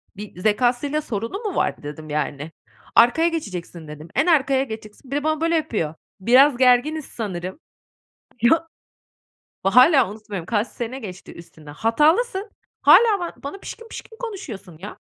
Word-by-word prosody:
bir 205 Hz, -3 st, -10 dB
zekâsıyla 245 Hz, +8 st, +1 dB
sorunu 230 Hz, -, -4 dB
mu 415 Hz, -4 st, -3 dB
vardı?" -, -, -1 dB
dedim, 150 Hz, +1 st, -8 dB
yani. 150 Hz, +1 st, -3 dB, 0.4 s
"Arkaya 245 Hz, +8 st, +5 dB
geçeceksin." 180 Hz, -, -5 dB
dedim. 150 Hz, +1 st, -10 dB
"En 275 Hz, -, +3 dB
arkaya 275 Hz, -5 st, +3 dB
geçeceksin." 220 Hz, +1 st, -10 dB
Bir -, -, -1 dB
de 290 Hz, -, -1 dB
bana 310 Hz, 0 st, 0 dB
böyle 330 Hz, +1 st, +2 dB
yapıyor: 225 Hz, -, -1 dB, 0.3 s
"Biraz 255 Hz, +6 st, +5 dB
gerginiz 260 Hz, +5 st, +3 dB
sanırım." 190 Hz, -, -6 dB, 0.8 s
Ya! 325 Hz, +8 st, +4 dB, 1.0 s
Bak, 195 Hz, -, 0 dB
hâlâ 255 Hz, -, +6 dB
unutmuyorum, 210 Hz, -5 st, -7 dB
kaç 210 Hz, +3 st, 0 dB
sene 245 Hz, +3 st, -6 dB
geçti 185 Hz, -6 st, -9 dB
üstünden. 160 Hz, -3 st, -13 dB
Hatalısın, 345 Hz, -, +1 dB, 0.3 s
hâlâ 445 Hz, -4 st, +6 dB
ba 345 Hz, -1 st, -4 dB
bana 285 Hz, +8 st, -6 dB
pişkin 460 Hz, +3 st, -9 dB
pişkin 445 Hz, 0 st, -10 dB
konuşuyorsun, 230 Hz, -, -7 dB
ya. 200 Hz, +6 st, -9 dB
245 Hz, 145 wpm, -22 LUFS, 190-310 Hz, 1.0 s, hâlâ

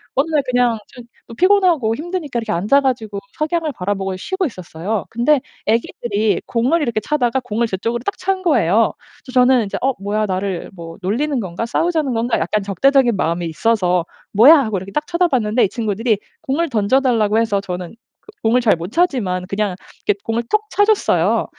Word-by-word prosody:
어느 280 Hz, +5 st, +1 dB
날 300 Hz, -2 st, +3 dB
그냥 245 Hz, -2 st, +2 dB
좀 245 Hz, -, -13 dB, 0.3 s
어 -, -, -9 dB
피곤하고 355 Hz, -, +3 dB
힘드니까 310 Hz, -4 st, -4 dB
이렇게 225 Hz, -, -4 dB
앉아가지고 220 Hz, +2 st, +1 dB, 0.2 s
석양을 315 Hz, 0 st, -1 dB
바라보고 195 Hz, 0 st, -2 dB
쉬고 380 Hz, -, -2 dB
있었어요. 185 Hz, -, -4 dB
근데 245 Hz, +6 st, +2 dB, 0.3 s
애기들이 220 Hz, -1 st, 0 dB
공을 255 Hz, +8 st, +1 dB
이렇게 235 Hz, -6 st, 0 dB
차다가 265 Hz, -3 st, 0 dB
공을 235 Hz, -1 st, -1 dB
저쪽으로 230 Hz, +4 st, -2 dB
딱 405 Hz, -, -1 dB
찬 385 Hz, 0 st, 0 dB
거예요. 225 Hz, -, +3 dB, 0.3 s
그래서 255 Hz, -, -9 dB
저는 250 Hz, -2 st, +4 dB
이제 200 Hz, -, -4 dB
어 270 Hz, -, +2 dB
뭐야 210 Hz, +2 st, -1 dB
나를 190 Hz, -2 st, -3 dB
뭐 165 Hz, -2 st, -10 dB
놀리는 260 Hz, +10 st, -1 dB
건가? 185 Hz, +3 st, -4 dB
싸우자는 310 Hz, +2 st, 0 dB
건가? 230 Hz, +1 st, 0 dB
약간 200 Hz, +6 st, 0 dB
적대적인 245 Hz, +5 st, +3 dB
마음이 170 Hz, -1 st, -1 dB
있어서 180 Hz, -1 st, +1 dB, 0.3 s
뭐야 255 Hz, +11 st, +8 dB
하고 220 Hz, -6 st, -1 dB
이렇게 190 Hz, +2 st, -7 dB
딱 300 Hz, 0 st, -2 dB
쳐다봤는데 260 Hz, -11 st, +1 dB
이 -, -, -2 dB
친구들이 220 Hz, 0 st, -1 dB, 0.2 s
공을 320 Hz, +5 st, -1 dB
던져 225 Hz, +2 st, +2 dB
달라고 225 Hz, -5 st, +2 dB
해서 220 Hz, -3 st, +1 dB
저는 180 Hz, 0 st, -6 dB, 0.5 s
공을 235 Hz, +3 st, +3 dB
잘 225 Hz, -, +4 dB
못 170 Hz, +4 st, -6 dB
차지만 235 Hz, -, 0 dB
그냥 200 Hz, -2 st, -1 dB, 0.3 s
이렇게 205 Hz, -, +2 dB
공을 230 Hz, +1 st, -1 dB
톡 425 Hz, -, +2 dB
차 410 Hz, -, +4 dB
줬어요. 430 Hz, -1 st, +2 dB
230 Hz, 405 characters per minute, -19 LUFS, 200-275 Hz, 0.5 s, 뭐야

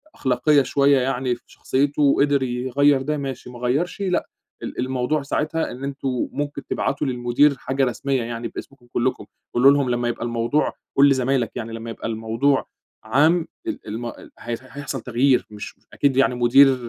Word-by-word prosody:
أخلاقية 135 Hz, +3 st, +3 dB
شويّة 140 Hz, 0 st, +3 dB
يعني 125 Hz, -1 st, 0 dB
في -, -, -20 dB
شخصيته، 140 Hz, +2 st, -1 dB
وقدر 140 Hz, -1 st, +3 dB
يغيّر 130 Hz, +3 st, +2 dB
ده 150 Hz, +3 st, -1 dB
ماشي، 135 Hz, -3 st, -5 dB
ما 120 Hz, -1 st, -10 dB
غيّرش 145 Hz, +11 st, -1 dB
لأ، 185 Hz, -2 st, 0 dB, 0.4 s
ال -, -, -6 dB
الموضوع 130 Hz, +3 st, 0 dB
ساعتها 155 Hz, +3 st, -1 dB
إن 130 Hz, +2 st, -8 dB
أنتم 135 Hz, -2 st, -2 dB
ممكن 145 Hz, -1 st, -4 dB
تبعتوا 140 Hz, +1 st, -1 dB
للمدير 125 Hz, +3 st, +2 dB
حاجة 135 Hz, 0 st, 0 dB
رسميّة 130 Hz, 0 st, -1 dB
يعني 115 Hz, 0 st, -4 dB
باسمكم 125 Hz, -1 st, -10 dB
كلّكم، 125 Hz, +2 st, -1 dB, 0.3 s
قولوا 135 Hz, +3 st, +6 dB
لهم 140 Hz, -2 st, +2 dB
لمّا 120 Hz, 0 st, 0 dB
يبقى 120 Hz, 0 st, -3 dB
الموضوع 120 Hz, +5 st, 0 dB, 0.2 s
قُل 140 Hz, +1 st, +7 dB
لزمايلك 130 Hz, -3 st, +1 dB
يعني 115 Hz, 0 st, -5 dB
لمّا 115 Hz, 0 st, -6 dB
يبقى 115 Hz, -, -5 dB
الموضوع 115 Hz, +5 st, 0 dB, 0.4 s
عام 155 Hz, +9 st, +3 dB, 0.2 s
ال 310 Hz, -, -5 dB
الم 115 Hz, +3 st, -5 dB, 0.3 s
هي 120 Hz, 0 st, -3 dB
هيحصل 135 Hz, 0 st, -6 dB
تغيير، 125 Hz, +3 st, +2 dB
مش 105 Hz, -1 st, -9 dB
مش -, -, -36 dB
أكيد 140 Hz, -2 st, +1 dB
يعني 135 Hz, -2 st, +3 dB
مدير 130 Hz, +3 st, +6 dB
130 Hz, 165 wpm, -22 LUFS, 120-140 Hz, 0.4 s, قُل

